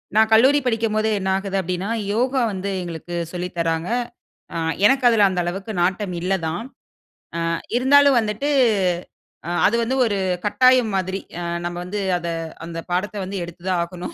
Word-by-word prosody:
நான் 220 0 +5
கல்லூரி 265 +6 +6
படிக்கும்போது 220 -2 +1
என்ன 190 0 -2
ஆகுது 195 0 -3
அப்டீன்னா, 185 +3 -3 0.2
யோகா 255 +3 +1
வந்து 195 +1 -4
எங்களுக்கு 175 0 -6 0.2
சொல்லி 180 0 -4
தராங்க. 165 +2 -1 0.6
அ, - - -3 0.3
எனக்கு 265 +3 +4
அதுல 215 -3 +5
அந்த 180 -1 -2
அளவுக்கு 195 +5 -4
நாட்டம் 190 +1 -1
இல்ல 185 +2 0
தான். 170 +8 -3 0.7
அ - - -1 0.4
இருந்தாலும் 280 +1 +5
வந்துட்டு, 220 +6 -2 1.0
அ - - -3 0.2
அது 210 - +3
வந்து 255 +3 -1
ஒரு 205 -3 0 0.3
கட்டாயம் 255 +1 +4
மாதிரி. 190 +1 -2 0.2
அ - - -4 0.2
நம்ப 175 0 -4
வந்து 205 +3 -4 0.2
அத 170 0 -5 0.4
அந்த 165 0 -6
பாடத்த 195 +4 -1
வந்து 195 +1 -5
எடுத்து 175 +1 -12
தான் 180 -2 +1
ஆகணும் 175 +1 -7
195 Hz, 160 wpm, -22 LUFS, 180-225 Hz, 1.0 s, கல்லூரி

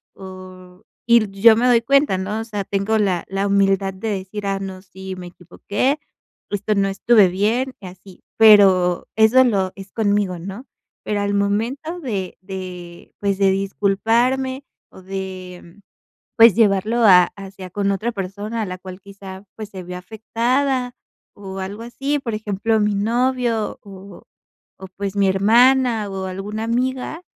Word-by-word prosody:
o 185 -1 -12 0.3
y 235 - +7
l 215 -2 +1
yo 230 0 +8
me 245 - +2
doy 240 -2 +4
cuenta, 275 -4 +2
¿no?, 205 +3 -3
o - - -4
sea, 210 -3 -4
tengo 200 +3 -1
la 185 -5 0
la 195 +1 -2
humildad 195 -1 +2
de 190 +4 -6
decir: 200 +1 -5
"Ah, 195 0 -1
no, 190 -1 -7
sí 190 0 -9
me 180 -1 -8
equivoqué. 200 - -3 0.5
Esto 205 +1 -1
no 200 -1 +2
estuve 205 +1 +4
bien" 225 +8 -1
y 190 - -8
así, 180 +1 -15
pero 195 -5 +5
eso 220 +4 +6
lo 195 -6 0
es 195 0 -11
conmigo, 205 -4 0
¿no?, 195 +8 -8 0.4
pero 210 -1 -2
al 200 0 -1
momento 230 - -1
de 200 - -4
de, 180 -2 -9
pues 200 -1 -1
de 195 -1 +4
disculparme 230 +7 0 0.3
o - - -13
de 185 -1 -8 0.6
pues 230 -3 +7
llevarlo 220 +2 +2
a 180 -4 +8
hacia 195 -1 -9
con 200 +2 -1
otra 215 +5 -2
persona 205 +3 -5
a 210 - -3
la 185 0 -6
cual 185 0 -10
quizá 195 -1 -11
pues 215 -2 -7
se 190 -2 -8
vio 180 0 -7
afectada 245 +6 -1 0.4
o 195 -1 -8
algo 200 +4 -6
así, 275 +5 -2
por 250 -5 -5
ejemplo, 215 +1 -1
mi 210 0 +1
novio 235 +1 0
o 195 -2 -13 0.5
o 190 - -9
pues 200 0 -4
mi 200 - +3
hermana 230 +3 +3
o 190 -1 -5
alguna 200 +4 -5
amiga, 255 +7 -2
200 Hz, 160 wpm, -20 LUFS, 190-230 Hz, 0.6 s, yo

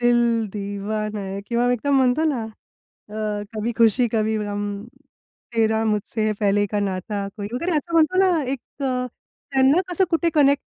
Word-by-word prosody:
दिल 235 -2 +3
दीवान 210 +1 -3
आहे 195 -1 -4
किंवा 240 +1 +1
एकदम 275 +4 +1
म्हणतो 260 +4 +3
ना 270 -7 0 0.7
अ 210 -1 -3
कभी 220 +2 -2
खुशी 230 +2 +4
कवी 220 0 +1
गम, 205 0 -3 0.7
तेरा 220 0 +2
मुझसे 215 0 0
पहले 205 0 +3
का 205 - +1
नाता 200 +1 -2
वगैरे 245 - -2
असं 335 +3 -3
म्हणतो 330 +3 +4
ना 365 -5 +3
एक 275 - -2 0.2
अ, 255 -2 0 0.5
त्यांना 270 +6 +4
कसं 370 +2 +2
कुठे 335 0 +2
कनेक्ट 280 -1 +4
225 Hz, 150 wpm, -22 LUFS, 210-270 Hz, 0.7 s, खुशी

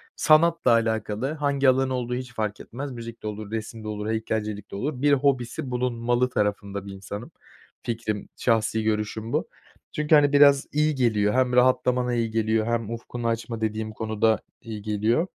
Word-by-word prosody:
sanatla 160 -3 +4
alakalı, 110 +3 0
hangi 140 -3 +2
alan 130 0 +2
olduğu 125 -1 -2
hiç 125 -1 -6
fark 105 -2 -3
etmez, 135 +3 -7
müzik 115 -2 -8
de - - -3
olur, 105 0 -6
resim 110 0 -5
de - - -7
olur, 105 0 -4
heykelcilik 110 -2 -3
de - - -6
olur, 130 +4 -3
bir 145 0 +4
hobisi 130 0 0
bulunmalı 120 0 0
tarafında 100 -2 -2
bir 100 - -7
insanım. 100 +4 -8 0.5
Fikrim, 110 -3 -3
şahsi 110 -2 +1
görüşüm 110 +1 -2
bu. - - 0 0.5
Çünkü, 150 +1 +3
hani, 145 -1 +4
biraz 140 -1 +6
iyi 150 0 +2
geliyor, 105 -5 +2
hem 130 -1 +2
rahatlamana 125 0 +3
iyi 115 -2 0
geliyor 110 0 +1
hem 115 -2 -1
ufkunu 115 0 -5
açma 115 0 -3
dediğim 110 0 -2
konuda 110 0 +1 0.2
iyi 110 -3 -7
geliyor. 110 - +1
115 Hz, 170 wpm, -25 LUFS, 110-130 Hz, 0.5 s, biraz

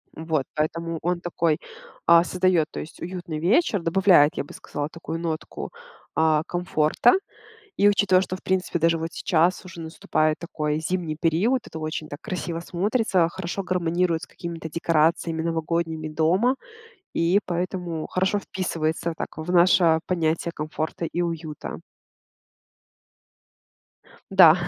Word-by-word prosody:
Вот, 160 -3 -1
поэтому 165 +2 -2
он 175 0 -1
такой, 165 -2 0 0.5
э, 170 0 +8
создает, 180 -3 +2
то - - -5
есть, 155 - -9
уютный 175 -3 -5
вечер, 205 - +2
добавляет, 170 -3 +5
я - - 0
бы - - -12
сказала, 145 +1 -5
такую 165 0 -6
нотку, 165 -2 -4 0.4
э, 155 -1 +3
комфорта. 175 +4 +2 0.6
И, 205 - +5
учитывая, 200 -2 +4
что 185 0 -3
в - - -17
принципе 185 -2 0
даже 165 0 +3
вот 165 0 -3
сейчас 175 +1 +1
уже 185 -2 -9
наступает 155 -1 0
такой 150 -2 -2
зимний 165 -1 -2
период, 180 - +2
это 160 - -7
очень 155 0 -4
так 145 +1 -8
красиво 180 -5 -4
смотрится, 190 0 +1
хорошо 185 +2 -4
гармонирует 175 -2 0
с - - -7
какими-то 165 -2 -7
декорациями 165 0 +1
новогодними 165 -1 -1
дома. 180 - +2 0.6
И 175 +4 +3
поэтому 175 -2 -3
хорошо 190 +2 +1
вписывается, 165 -3 -2
так, - - -6
в 160 +3 -3
наше 170 -2 +5
понятие 165 -1 0
"комфорта 155 +2 -3
и 175 +1 -1
уюта." 165 -3 -4 2.5
Да, 180 -5 +9
170 Hz, 135 wpm, -24 LUFS, 160-180 Hz, 2.5 s, Да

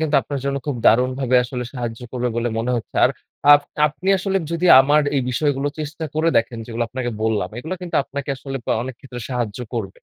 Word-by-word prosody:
কিন্তু 155 -1 0
আপনার 140 -2 -4
জন্য 140 0 0
খুব 145 -4 -1
দারুণভাবে 130 +2 +3
আসলে 125 0 -4
সাহায্য 120 -3 -5
করবে 125 -1 -1
বলে 120 +1 0
মনে 120 +2 -1
হচ্ছে। 115 - -6
আর - - +4 0.4
আপ 145 - +8 0.3
আপনি 165 +6 -5
আসলে 195 +1 -1 0.2
যদি 170 +2 0
আমার 145 +3 +4
এই 135 - +2
বিষয়গুলো 145 +1 0
চেষ্টা 155 +2 -5
করে 155 +2 +2
দেখেন 115 +1 -3
যেগুলা 115 0 -2
আপনাকে 125 0 -3
বললাম, 105 -5 0
এইগুলা 160 +8 -4
কিন্তু 175 - -2
আপনাকে 140 +1 -6
আসলে 135 0 -6
আ - - +4
অনেক 130 0 -6
ক্ষেত্রে 125 -3 -8
সাহায্য 120 -4 -2 0.2
করবে। 100 -5 -4
130 Hz, 200 wpm, -21 LUFS, 120-145 Hz, 0.4 s, আপ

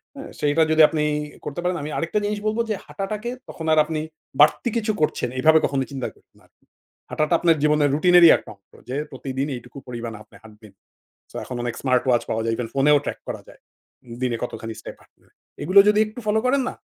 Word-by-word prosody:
হ্যাঁ। 275 - -9
সেইটা 150 +2 +3
যদি 160 0 +5
আপনি 155 -2 -1 0.4
করতে 150 +3 -5
পারেন 180 0 0
আমি 150 - -5
আরেকটা 170 +5 -1
জিনিস 205 0 -2
বলবো 220 +2 0
যে 215 - 0
হাঁটাটাকে 210 +4 -5 0.2
তখন 160 - -7
আর - - +2
আপনি 155 -1 -3 0.4
বাড়তি 155 - +4
কিছু 220 -1 0
করছেন, 155 - 0
এইভাবে 160 +4 +5
কখনো 135 -1 0
চিন্তা 135 -3 -4
করবেন - - -30
না - - -25
আর। - - -45 0.6
হাঁটাটা 155 +2 0
আপনার 165 -2 +3
জীবনের 150 -1 +3
রুটিনেরই 175 +1 +7
একটা - - -13
অংশ 100 -1 -43 0.2
যে 130 - -3 0.2
প্রতিদিনই 135 +1 -4
এইটুকু 125 +3 -14
পরিমাণ 120 -2 -6
আপনি - - -22
হাঁটবেন। 110 -2 -16 0.6
So - - -17
এখন 125 - -7
অনেক 120 -1 -2
স্মার্ট-ওয়াচ 125 -2 +2
পাওয়া 110 - -1
যায়। 115 0 0
Even 120 - -3
ফোনেও 145 +2 +4
track - - -4
করা - - -5
যায়, - - -17 0.6
দিনে 125 -2 0
কতখানি 115 -2 -5
স্টেপ - - -9
হাঁটলেন। - - -28 0.3
এগুলো 190 +3 +6
যদি 210 0 +3
একটু 215 +3 -10
ফলো 215 +1 +3
করেন 270 +2 +2
না, - - -8
150 Hz, 205 wpm, -23 LUFS, 125-180 Hz, 0.6 s, রুটিনেরই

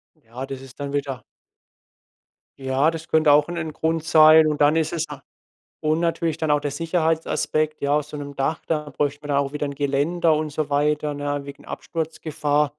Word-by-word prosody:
Ja, 130 -2 -8
das 135 -1 -7
ist 135 +1 -14
dann 140 -1 -4
wieder 140 -3 -3 1.4
Ja, 135 +4 +2
das 165 0 -7
könnte 155 -2 +4
auch 145 0 +5
'n 175 0 -5
'n 160 -2 -3
Grund 160 +1 -1
sein 155 0 +7
und 150 -1 -1
dann 145 +2 +5
ist 160 -1 +1
es 165 -1 -1
na - - -9 0.6
und 155 +1 +2
natürlich 165 -2 0
dann 160 -2 -2
auch 145 0 +3
der 145 - -2
Sicherheitsaspekt. 160 -1 0
Ja, 145 +1 +2
auf 150 - -3
so 150 - -8
'nem 145 -1 -7
Dach, 145 +4 -1
da 150 -2 -2
bräuchten 145 0 -2
wir - - -7
dann 140 -1 +2
auch 140 0 -1
wieder 150 0 -2
'n 140 - -5
Geländer 150 +4 +1
und 155 0 -2
so 150 0 -3
weiter, 150 +1 +1
ne, 145 0 -3
wegen 140 - -11
Absturzgefahr. 150 -2 -2
150 Hz, 200 wpm, -23 LUFS, 145-160 Hz, 1.4 s, sein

